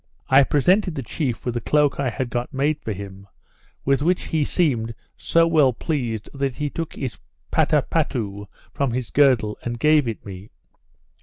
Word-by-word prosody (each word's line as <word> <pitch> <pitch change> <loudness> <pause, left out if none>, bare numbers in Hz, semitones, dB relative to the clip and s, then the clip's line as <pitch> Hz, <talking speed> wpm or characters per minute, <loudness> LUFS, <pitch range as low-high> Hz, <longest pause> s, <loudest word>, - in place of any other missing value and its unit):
I 135 +1 +7
presented 180 +7 +2
the 135 - -4
chief 125 +1 -3
with 125 - -1
the 120 - -2
cloak 150 +3 +2
I 135 -2 +1
had 120 +1 -4
got 120 +1 -2
made 145 +3 0
for 110 - -4
him, 100 0 -8 0.6
with 140 0 +2
which 175 +4 +1
he 155 -2 +1
seemed 120 -9 0 0.2
so 165 0 +3
well 155 -6 +4
pleased, 115 -6 -3
that 135 -2 -2
he 150 -1 -3
took 165 -1 -4
his 120 -8 -5 0.3
pattapattou 100 -3 0 0.3
from 135 -4 -1
his 125 -2 -3
girdle 125 -7 +3
and 120 0 -4
gave 150 +1 +4
it 115 - -5
me. 95 +1 -9
130 Hz, 170 wpm, -23 LUFS, 115-150 Hz, 0.6 s, I